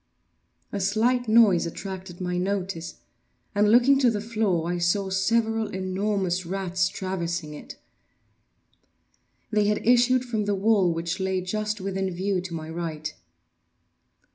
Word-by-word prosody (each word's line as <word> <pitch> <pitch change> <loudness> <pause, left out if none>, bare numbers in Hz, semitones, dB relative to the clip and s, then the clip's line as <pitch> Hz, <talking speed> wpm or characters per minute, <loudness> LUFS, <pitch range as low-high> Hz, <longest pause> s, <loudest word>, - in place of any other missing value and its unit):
A 200 - -3
slight 225 +5 +1
noise 215 -7 +5
attracted 185 0 -7
my 180 -1 -2
notice, 185 -3 -3 0.6
and, 210 0 +3
looking 250 +4 +5
to 255 -3 +4
the 215 -3 -1
floor, 210 -6 0
I 175 - -2
saw 190 +3 +1
several 225 +3 +1
enormous 190 -1 -1
rats 185 +1 -1
traversing 175 -4 -3
it. 150 - -10 1.8
They 210 -1 +2
had 210 - 0
issued 250 +1 +4
from 220 -4 -2
the 205 0 +1
well, 195 -3 +3
which 165 +3 -3
lay 190 0 0
just 215 +3 -2
within 195 0 -2
view 185 +1 -1
to 180 -1 -7
my 155 -1 -6
right. 160 -2 -4
190 Hz, 135 wpm, -25 LUFS, 180-215 Hz, 1.8 s, noise